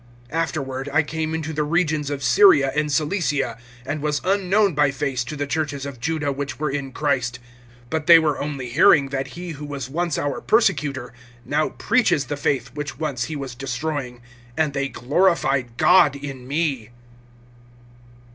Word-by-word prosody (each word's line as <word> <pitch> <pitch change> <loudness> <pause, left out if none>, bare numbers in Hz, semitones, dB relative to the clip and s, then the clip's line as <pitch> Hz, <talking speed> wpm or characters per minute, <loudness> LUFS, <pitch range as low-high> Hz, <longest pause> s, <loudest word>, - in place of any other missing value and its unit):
(21)Afterward, 145 -5 -2
I 150 +2 +3
came 160 +1 -3
into 160 0 -4
the 155 - -1
regions 155 -2 0
of 140 -1 -4
Syria 135 +1 +5
and 150 0 0
Cilicia; 145 - 0 0.3
(22)and 150 +4 -3
was 150 0 -1
unknown 195 +1 +2
by 145 0 +3
face 135 -2 -2
to 150 - -6
the 145 0 -2
churches 145 -2 -2
of 140 -3 -7
Juda 155 0 -1
which 140 0 -4
were 150 -2 -1
in 135 -1 -4
Christ; 130 -4 -1 0.5
(23)but 160 -1 -1
they 170 -1 +10
were 155 -3 +1
only 140 -4 -4
hearing, 145 0 +5
that 135 -1 -3
he 175 -1 -6
who 150 -1 -7
was 140 -2 -6
once 170 0 -1
our 145 -1 -2
persecutor 145 - +1 0.3
now 150 +2 0
preaches 205 - +1
the 145 - -3
faith 140 -1 -1
which 150 0 -5
once 140 -6 -2
he 155 - -5
was 135 -3 -5
destroying; 130 -1 -4 0.3
(24)and 155 -3 +1
they 140 0 -1
glorified 135 -4 +1
God 165 -1 +5
in 135 -3 -8
me. 140 -6 -1
145 Hz, 165 wpm, -22 LUFS, 135-160 Hz, 0.5 s, they